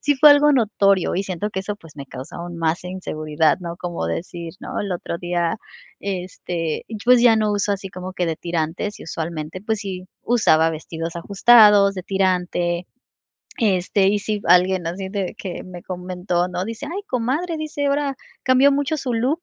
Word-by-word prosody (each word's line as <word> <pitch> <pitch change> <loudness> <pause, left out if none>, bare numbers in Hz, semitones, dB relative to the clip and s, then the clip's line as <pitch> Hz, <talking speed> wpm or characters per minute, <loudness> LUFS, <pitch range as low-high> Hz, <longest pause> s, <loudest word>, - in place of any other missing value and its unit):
sí 290 - +2
fue 295 +2 +8
algo 290 +1 +6
notorio 200 -6 +2
y 190 - +1
siento 190 +1 -3
que 190 - -3
eso, 205 +2 -4
pues, 165 -7 -17
me 140 -1 -7
causó 130 +2 -9 0.2
más 165 +1 -1
inseguridad, 155 -4 0
¿no?, 170 -1 -6
como 175 -1 -4
decir 170 -1 -5
¿No? - - -5
El 200 -2 -3
otro 175 -1 -4
día, 175 +3 -1 0.4
este, 180 -4 -3 0.2
pues 250 0 +6
ya 240 -2 +7
no 215 -1 +1
uso 205 0 +1
así 195 -1 -4
como 185 0 -7
que 180 -2 -1
de 160 -1 -1
tirantes 170 +5 -3
y - - -9
usualmente, 165 +1 -5
pues, 215 +1 -2
sí 185 -3 -5 0.2
usaba 165 -9 +4
vestidos 165 +1 -5
ajustados, 205 +1 +6
de 185 - -5
tirante. 180 -2 0 0.7
Este, 195 -2 +2
y 205 +1 +2
si 210 0 -2
alguien 180 0 +4
así 190 +3 -4
de 195 -3 -3
que 185 -3 -6
me 180 -1 -10
comentó, 180 -1 -2
¿no?, 180 0 -3
dice: 230 +7 -6
"Ay 370 +6 -4
comadre", 275 +8 -1
dice 300 -2 -3
ahora. 280 0 0 0.3
"Cambió 260 +2 +5
mucho 285 +2 0
su 260 -4 -2
look". 260 +8 0
190 Hz, 180 wpm, -21 LUFS, 175-220 Hz, 0.7 s, fue